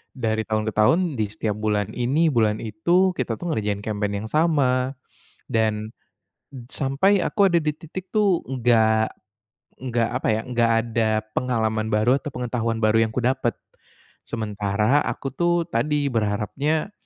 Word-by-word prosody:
dari 110 -3 -1
tahun 110 0 0
ke 110 - -2
tahun 110 +11 +4 0.2
di 105 - +1
setiap 110 -1 -2
bulan 105 -2 0
ini, 140 +7 +2
bulan 110 -3 +2
itu, 170 - +2
kita 120 -3 -1
tuh 175 - -3
ngerjain 105 -2 -1
campaign 105 -1 -2
yang - - -7
sama," 135 -5 +2 0.6
dan 110 -1 0 0.8
sampai 150 +9 +2
aku 200 -2 +3
ada 170 - +5
di 150 - +1
titik 180 +4 -8
tuh 205 -5 +3
nggak 115 -4 +2 0.6
nggak 120 -3 -1
apa 125 +2 -2
ya 110 - 0
nggak 120 -2 +2
ada 110 -2 0 0.2
pengalaman 110 -3 0
baru 110 +5 +3
atau 145 - -7
pengetahuan 115 -2 -2
baru 110 +1 +3
yang 110 - -2
kudapat. 125 0 0 0.7
Sementara 105 +3 0
aku 135 - -4
tuh 175 -1 +1
tadi 145 +1 0
berharapnya 120 - -1
115 Hz, 145 wpm, -23 LUFS, 110-140 Hz, 0.8 s, ada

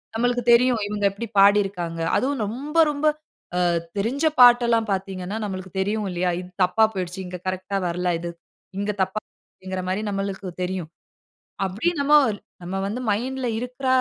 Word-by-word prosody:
நம்மளுக்கு 245 +1 +1
தெரியும். 240 -1 +5
இவங்க 205 -1 -2
எப்படி 225 +4 -6
பாடியிருக்காங்க? 195 -5 +3 0.2
அதுவும் 270 -2 0
ரொம்ப 270 +9 -6 0.2
ரொம்ப 295 +1 0 0.6
அ - - +4 0.3
தெரிஞ்ச 255 +10 0
பாட்டெல்லாம் 240 -2 +6
பார்த்தீங்கன்னா, 190 +1 -3
நம்மளுக்கு 190 -1 -6
தெரியும் 205 +1 0
இல்லையா? 180 +1 0
"இது 180 - -11
தப்பா 220 +5 +3
போயிடுச்சு. 180 0 -4
இங்க 180 0 -7
கரெக்ட்‌டா 185 +1 -2
வரல. 180 +1 -1
இது 170 0 -5 0.5
இங்க 205 +1 0
தப்பாகுதுங்கிற" 190 -1 -7
மாதிரி 200 +3 -1
நம்மளுக்கு 195 -1 -3
தெரியும். 180 -3 -3 0.8
அப்டி 215 - 0
நம்ம 280 +1 +1 0.5
நம்ம 180 +2 -4
வந்து 220 +5 -3
மைண்ட்‌ல 250 +4 -1
இருக்கிற 250 +2 -5
200 Hz, 140 wpm, -23 LUFS, 185-240 Hz, 0.8 s, பாட்டெல்லாம்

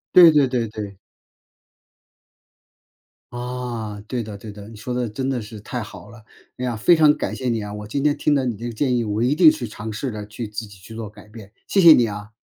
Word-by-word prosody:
对 175 -2 +10
对 145 -3 +4
对 125 -2 -1
对。 105 -3 -7 2.3
啊， 120 -4 -5
对 125 0 -2
的 105 -2 -8
对 105 +1 -9
的， 100 0 -11
你 115 - -12
说 125 +4 -5
得 125 -2 -1
真 130 +5 -3
的 130 -3 -1
是 110 0 -9
太 120 +4 -5
好 110 - -10
了， 115 -2 -14 0.3
哎 125 - -3
呀， 120 -2 -1
非 140 +11 +5
常 155 -2 +5
感 - - -3
谢 130 -2 -2
你 115 -2 0
啊， 105 0 -6
我 105 0 -7
今 140 +6 -2
天 145 -1 +3
听 150 - +1
了 135 - +1
你 120 -3 -1
这 115 +4 -8
个 120 - -4
建 125 +2 +1
议， 120 - +1
我 105 +1 -1
一 130 +4 +3
定 160 -1 +7
去 120 - -5
尝 105 +1 -7
试 120 +4 -3
着 105 -1 -6
去 110 +1 -6
自 105 +2 -5
己 100 -1 -15
去 105 +4 -12
做 110 -2 -6
改 105 - -16
变， 105 -2 -12 0.2
谢 195 - +3
谢 170 -2 +10
你 120 - +4
啊。 105 0 -7
115 Hz, 260 characters per minute, -22 LUFS, 105-125 Hz, 2.3 s, 对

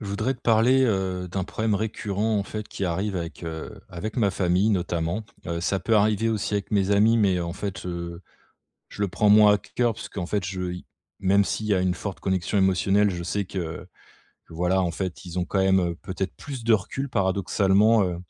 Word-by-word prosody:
Je 105 - -7
voudrais 100 +7 -1
te 120 - -20
parler, 120 +4 +4
heu, 95 -5 -1
d'un 95 +1 -2
problème 110 +2 -1
récurrent, 105 0 -1
en - - 0
fait, 105 +1 -6
qui 100 - -4
arrive 95 +3 -1
avec, 85 0 -6
heu, 80 -1 -6
avec 105 +5 -6
ma 105 -5 +3
famille 95 +3 +2
notamment. 90 +1 -1 0.2
Heu, 85 0 -2
ça 95 +3 0
peut 110 +5 +2
arriver 105 +1 +2
aussi 105 -2 -1
avec 100 -1 -2
mes 100 -2 +1
amis 110 +3 +4
mais, 95 -5 +2
en 85 -1 -3
fait, 95 +1 -5
heu, 85 0 -5 0.7
je 105 - -5
le 100 - +1
prends 105 +3 +1
moins 105 0 +7
à - - +3
c 100 - -15
cœur, 120 -2 +2
parce 110 - -8
qu'en 90 -4 -5
fait 100 0 -1
je 90 -1 -3
i 90 - -8 0.4
même 100 +1 +4
s'il 110 - -3
y 105 - +1
a 95 - +2
une 90 -1 +1
forte 95 +1 -6
connexion 95 +1 0
émotionnelle, 95 +2 +3
je 85 -2 -4
sais 100 +4 -2
que 85 -3 -5 0.6
que - - -13
voilà, 90 +3 +1
en 85 -2 -1
fait, 90 0 -5
ils 90 0 -5
ont 90 - 0
quand 95 - -2
même, 95 0 +4
heu, 85 -1 -1
peut-être 95 0 -3
plus 135 -3 -7
de 115 - +4
recul 110 +7 -1
paradoxalement, 100 +1 +3
heu, 90 -2 -2
95 Hz, 225 wpm, -25 LUFS, 90-105 Hz, 0.7 s, moins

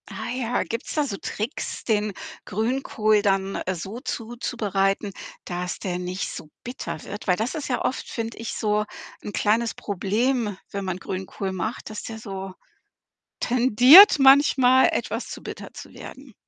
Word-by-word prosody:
Ah - - -6
ja, 245 -2 -1
gibt's 230 +3 -5
da 300 - +2
so 210 -8 -4
Tricks, 220 +9 -5
den 210 -2 0 0.3
Grünkohl 215 -1 +1
dann 195 -1 0
so 190 +6 -6
zuzubereiten, 215 -5 -2 0.3
dass 180 0 -4
der 180 -2 -3
nicht 180 +1 -3
so 155 - -9
bitter 245 +2 -6
wird? 205 +2 -8
Weil 180 - +4
das 225 +4 -2
ist 305 - -4
ja 250 - 0
oft, 260 - -2
finde 230 -1 -4
ich, 230 - -4
so 210 -1 0 0.4
'n 210 - -5
kleines 225 +3 +1
Problem, 210 +2 -1
wenn 200 -1 -4
man 185 -1 -2
Grünkohl 190 +1 -5
macht, 220 +6 -4
dass 215 - -6
der 225 - -6
so 195 -3 -7 0.9
tendiert 255 - +8
manchmal, 270 -2 +6
etwas - - -3
zu - - -8
bitter - - -7
zu - - -10
werden. 265 -2 -11
215 Hz, 155 wpm, -24 LUFS, 195-245 Hz, 0.9 s, tendiert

